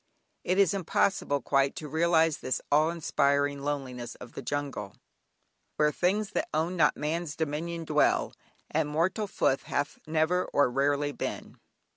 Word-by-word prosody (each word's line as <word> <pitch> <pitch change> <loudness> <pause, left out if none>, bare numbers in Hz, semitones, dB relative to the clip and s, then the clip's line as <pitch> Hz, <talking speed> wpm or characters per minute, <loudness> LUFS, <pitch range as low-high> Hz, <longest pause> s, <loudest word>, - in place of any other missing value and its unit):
It 185 - 0
is 200 -3 +4
impossible 175 -6 0
quite 135 0 +2
to 155 - -6
realise 160 -1 +3
this 130 - -2
awe 155 +2 +4
inspiring 140 -3 +1
loneliness 135 -4 -4
of 120 - -12
the - - -6
jungle 135 -7 -4 0.8
"Where 150 0 +3
things 200 +6 0
that - - -2
own 165 +4 0
not 170 - +3
man's 155 +1 -2
dominion 165 +2 -3
dwell." - - +2 0.4
"And 155 -1 0
mortal 170 +8 0
foot 135 -7 +1
hath 145 - -3
ne'er 160 +3 +1
or 140 -3 +3
rarely 145 +2 +1
been." - - -6
150 Hz, 145 wpm, -29 LUFS, 140-170 Hz, 0.8 s, is